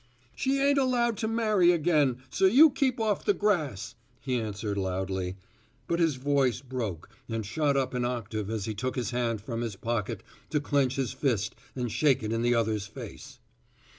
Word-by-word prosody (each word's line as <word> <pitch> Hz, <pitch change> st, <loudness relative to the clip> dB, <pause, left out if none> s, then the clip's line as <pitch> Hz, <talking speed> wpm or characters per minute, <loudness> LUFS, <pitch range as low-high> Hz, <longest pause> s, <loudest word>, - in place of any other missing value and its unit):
"She 275 Hz, +1 st, 0 dB
ain't 280 Hz, 0 st, +3 dB
allowed 245 Hz, -3 st, +2 dB
to 220 Hz, -, -1 dB
marry 215 Hz, -6 st, +3 dB
again, 150 Hz, -7 st, +2 dB
so -, -, +2 dB
you 280 Hz, +10 st, +7 dB
keep 260 Hz, -2 st, 0 dB
off 215 Hz, -2 st, 0 dB
the 410 Hz, -, +2 dB
grass," 155 Hz, -, 0 dB, 0.3 s
he 130 Hz, -3 st, -1 dB
answered 105 Hz, -1 st, -3 dB
loudly, 95 Hz, -1 st, -2 dB, 0.5 s
but 170 Hz, +4 st, -1 dB
his 165 Hz, -4 st, +3 dB
voice 135 Hz, -2 st, +1 dB
broke 120 Hz, -, -5 dB, 0.2 s
and 115 Hz, -2 st, -2 dB
shot 145 Hz, +5 st, +1 dB
up 135 Hz, -1 st, 0 dB
an 125 Hz, -1 st, -1 dB
octave 110 Hz, -4 st, -3 dB
as 110 Hz, -3 st, -2 dB
he 110 Hz, -, -3 dB
took 130 Hz, +5 st, -3 dB
his 125 Hz, -2 st, -2 dB
hand 120 Hz, -3 st, -1 dB
from 115 Hz, +1 st, -4 dB
his 115 Hz, -4 st, -3 dB
pocket 115 Hz, 0 st, -3 dB, 0.3 s
to 150 Hz, -, +1 dB
clench 140 Hz, -3 st, +1 dB
his 130 Hz, -3 st, -1 dB
fist 130 Hz, -7 st, -1 dB, 0.2 s
and 125 Hz, -3 st, -2 dB
shake 140 Hz, -3 st, +2 dB
it 110 Hz, +1 st, -2 dB
in 115 Hz, -, 0 dB
the 120 Hz, 0 st, +3 dB
other's 110 Hz, -3 st, 0 dB
face. 105 Hz, -, -10 dB
130 Hz, 185 wpm, -28 LUFS, 110-170 Hz, 0.5 s, you